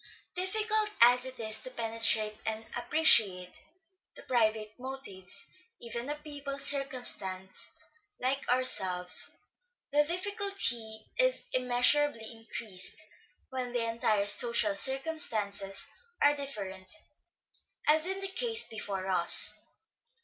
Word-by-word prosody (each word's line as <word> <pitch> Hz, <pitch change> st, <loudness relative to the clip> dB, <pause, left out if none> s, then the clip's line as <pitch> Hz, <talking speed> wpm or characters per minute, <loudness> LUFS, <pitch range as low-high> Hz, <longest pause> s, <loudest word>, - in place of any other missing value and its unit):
Difficult 425 Hz, +3 st, +1 dB
as 245 Hz, +2 st, +6 dB
it 260 Hz, -1 st, -9 dB
is 220 Hz, -1 st, -2 dB
to -, -, -8 dB
penetrate 225 Hz, -2 st, 0 dB
and 220 Hz, 0 st, -3 dB
appreciate 210 Hz, -, +3 dB, 0.5 s
the -, -, -12 dB
private 215 Hz, -3 st, 0 dB
motives 255 Hz, -8 st, -2 dB, 0.3 s
even 235 Hz, +2 st, -6 dB
of 295 Hz, 0 st, -6 dB
people 285 Hz, -2 st, -7 dB
circumstanced 245 Hz, -10 st, 0 dB, 0.3 s
like 265 Hz, +1 st, -2 dB
ourselves, 185 Hz, -8 st, +3 dB, 0.6 s
the 295 Hz, +1 st, +3 dB
difficulty 345 Hz, -, -1 dB
is -, -, +1 dB
immeasurably 250 Hz, -1 st, +2 dB
increased 225 Hz, -3 st, -5 dB, 0.5 s
when 255 Hz, -2 st, -4 dB
the 240 Hz, -1 st, -1 dB
entire 220 Hz, -3 st, 0 dB
social 220 Hz, 0 st, +4 dB
circumstances 215 Hz, -9 st, 0 dB, 0.3 s
are 290 Hz, 0 st, +4 dB
different, 200 Hz, -10 st, -7 dB, 1.0 s
as 310 Hz, +3 st, +3 dB
in 385 Hz, +1 st, -2 dB
the 390 Hz, -, -2 dB
case 460 Hz, +3 st, 0 dB
before 200 Hz, -4 st, -5 dB
us. 185 Hz, -1 st, +5 dB
245 Hz, 105 wpm, -30 LUFS, 215-290 Hz, 1.0 s, as